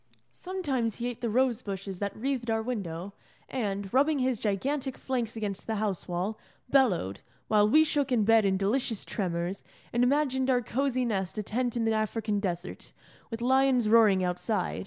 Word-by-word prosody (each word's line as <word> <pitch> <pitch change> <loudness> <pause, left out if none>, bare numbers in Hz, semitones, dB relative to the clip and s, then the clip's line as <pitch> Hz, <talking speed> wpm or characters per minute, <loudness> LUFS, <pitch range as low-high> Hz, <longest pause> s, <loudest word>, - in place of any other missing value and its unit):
Sometimes 280 - -2
he 240 - -4
ate 245 -1 -6
the 235 - -1
rose 250 +1 +2
bushes 195 -3 -6
that 200 -1 -3
wreathed 250 0 -2
our 225 0 +1
window, 195 -6 -4 0.3
and, 200 -6 -3
rubbing 290 +3 +3
his 255 -3 0
gigantic 265 +6 -1
flanks 240 -4 -2
against 205 -3 -4
the 225 - -1
house 205 -3 -2
wall, 180 +5 -2 0.3
bellowed, 180 - +2 0.3
while 210 -1 +4
we 310 +7 +6
shook 290 -3 0
in 235 -4 +3
bed 225 +1 +5
in 190 -1 +2
delicious 220 +2 0
tremors, 180 -1 -3 0.3
and 240 +1 +3
imagined 265 -1 +2
our 250 -2 +3
cosy 255 +1 0
nest 195 -4 -2
a 210 - -1
tent 240 +3 -1
in 230 - 0
the 225 - +2
African 215 -1 -1
desert, 180 -2 -5 0.4
with 230 0 -5
lions 260 -3 +3
roaring 215 -4 +5
outside. 180 +4 -1
225 Hz, 175 wpm, -29 LUFS, 200-255 Hz, 0.4 s, we